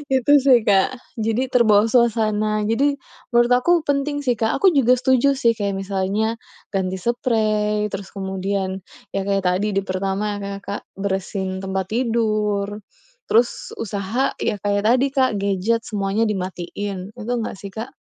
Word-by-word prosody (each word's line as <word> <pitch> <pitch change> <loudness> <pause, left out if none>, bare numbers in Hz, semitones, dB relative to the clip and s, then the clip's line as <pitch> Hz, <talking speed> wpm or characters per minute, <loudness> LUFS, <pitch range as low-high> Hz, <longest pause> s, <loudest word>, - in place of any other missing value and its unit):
Itu 260 +3 +3
sih 255 -3 +6
Kak. 200 +5 +3 0.2
Jadi 225 +4 0
terbawa 215 -3 +5
suasana. 215 -3 +2
Jadi, 280 +6 +2 0.4
menurut 240 +1 +4
aku 250 +8 +3 0.2
penting 285 +1 0
sih 245 -2 +2
Kak. 220 -1 0
Aku 385 - +7
juga 255 -3 +5
setuju 260 +2 +3
sih 235 -3 +3
kayak 200 -2 -1
misalnya, 195 +3 -1 0.4
ganti 190 -1 -1
seprei, 215 -3 0
terus 195 0 -6
kemudian 190 0 -2 0.4
ya 195 - 0
kayak 195 -1 +1
tadi 195 +4 +1
di 195 - +2
pertama 195 +2 -2
nge 200 0 -5
Kak, 200 - -5 0.2
bersihin 190 -1 -2
tempat 190 -1 -2
tidur, 215 -4 0 0.6
terus 235 +2 +1
usaha 210 +4 -1
ya - - 0
kayak 205 0 0
tadi 255 +3 +4
Kak 260 -2 +3
gadget 200 +4 0
semuanya 205 +1 0
dimatiin. 190 +1 -4
Betul 240 +2 -2
nggak - - -6
sih 200 - -7
Kak? 225 +3 -7
210 Hz, 150 wpm, -21 LUFS, 195-235 Hz, 0.6 s, Aku